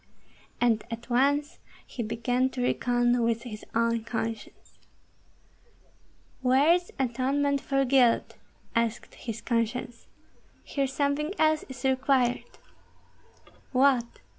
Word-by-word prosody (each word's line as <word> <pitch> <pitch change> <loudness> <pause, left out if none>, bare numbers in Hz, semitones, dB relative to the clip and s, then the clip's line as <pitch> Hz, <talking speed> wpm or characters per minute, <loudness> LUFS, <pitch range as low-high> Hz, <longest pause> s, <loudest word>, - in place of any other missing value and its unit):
And 230 -3 +2
at 235 +1 -7
once 285 +4 +1 0.3
he 245 - -6
began 245 +3 0
to 255 -1 -4
reckon 245 0 +1
with 230 0 0
his 215 -4 -8
own 230 0 +1
conscience. 225 -1 -6 1.6
"Where 265 +5 +4
is 350 0 -1
atonement 270 +2 0
for 275 0 +1
guilt?" 250 -3 +3 0.4
asked 230 0 -1
his 225 -2 -7
conscience. 235 +1 -2 0.6
"Here 275 -1 -1
something 285 +6 -1
else 310 0 +2
is 255 -2 -9
required!" 260 -2 +2 1.3
"What?" 255 -2 +2
250 Hz, 105 wpm, -27 LUFS, 235-275 Hz, 1.6 s, Where